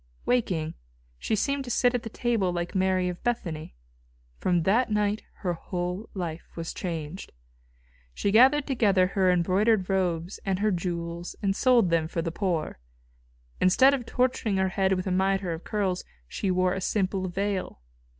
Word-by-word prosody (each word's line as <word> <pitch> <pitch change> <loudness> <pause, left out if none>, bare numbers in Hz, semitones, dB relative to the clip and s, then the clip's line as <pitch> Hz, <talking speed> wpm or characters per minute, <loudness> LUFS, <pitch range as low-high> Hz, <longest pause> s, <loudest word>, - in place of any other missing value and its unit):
Waking, 180 -10 0 0.5
she - - 0
seemed 275 +6 0
to - - -7
sit 245 +1 +2
at 245 - 0
the 225 - -6
table 225 -5 0
like 175 0 -3
Mary 185 -1 +1
of 180 -1 -5
Bethany. 170 - -3 0.6
From 175 -2 +1
that 225 +8 +2
night 210 0 0 0.2
her 175 - +1
whole 180 +4 -4
life 170 -3 -4
was 165 -1 -5
changed. 165 0 -5 0.8
She 200 - -1
gathered 265 +6 +6
together 205 -9 +3
her 185 0 +1
embroidered 190 +3 +2
robes 180 -1 -1
and 195 -1 0
her 210 +2 +1
jewels 170 -1 -4
and 195 -1 +1
sold 235 -8 +4
them 165 -1 +2
for 165 0 -3
the 165 - -2
poor. 170 - -2 0.8
Instead 260 +10 +5
of 250 -4 -3
torturing 250 -5 0
her 190 0 +2
head 190 0 +1
with 185 -1 -2
a 190 - -1
mitre 190 -1 +1
of 160 - -7
curls, 195 -4 -1 0.2
she 195 - -3
wore 185 0 +2
a 190 - -3
simple 190 -1 -1
veil. 195 - -3
190 Hz, 165 wpm, -27 LUFS, 175-210 Hz, 0.8 s, gathered